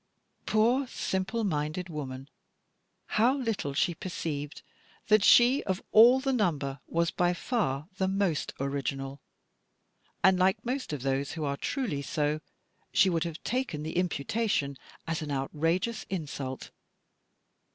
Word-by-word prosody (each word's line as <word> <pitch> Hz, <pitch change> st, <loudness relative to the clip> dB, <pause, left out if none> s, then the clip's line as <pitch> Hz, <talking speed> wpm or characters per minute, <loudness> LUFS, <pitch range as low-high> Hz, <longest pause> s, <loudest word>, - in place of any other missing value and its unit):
Poor 240 Hz, +5 st, +3 dB
simple 195 Hz, +2 st, -2 dB
minded 155 Hz, -1 st, -1 dB
woman; 135 Hz, -5 st, -6 dB, 0.8 s
how 245 Hz, +6 st, +2 dB
little 220 Hz, -, -2 dB
she 175 Hz, -, +2 dB
perceived 150 Hz, -4 st, -5 dB, 0.5 s
that 215 Hz, -1 st, +5 dB
she 245 Hz, +6 st, +6 dB
of 190 Hz, -1 st, -1 dB
all 240 Hz, +4 st, +8 dB
the 270 Hz, 0 st, 0 dB
number 150 Hz, -, 0 dB
was 170 Hz, 0 st, +1 dB
by 175 Hz, 0 st, +1 dB
far 165 Hz, -, -1 dB
the 190 Hz, -, +1 dB
most 190 Hz, -6 st, 0 dB
original! 135 Hz, 0 st, -3 dB, 1.0 s
And, 190 Hz, -1 st, +5 dB
like 190 Hz, +4 st, +2 dB
most 255 Hz, -, -2 dB
of 145 Hz, -4 st, -4 dB
those 135 Hz, +1 st, -1 dB
who 160 Hz, -, -4 dB
are 140 Hz, 0 st, -1 dB
truly 185 Hz, -, -2 dB
so, 150 Hz, +1 st, -1 dB, 0.5 s
she 190 Hz, -, +4 dB
would 165 Hz, -1 st, 0 dB
have 165 Hz, -1 st, -6 dB
taken 240 Hz, -, -2 dB
the 160 Hz, -, -5 dB
imputation 180 Hz, -2 st, 0 dB, 0.3 s
as 165 Hz, 0 st, -2 dB
an 150 Hz, -2 st, -4 dB
outrageous 165 Hz, +10 st, -1 dB
insult. 140 Hz, -7 st, -5 dB
170 Hz, 130 wpm, -29 LUFS, 145-215 Hz, 1.0 s, all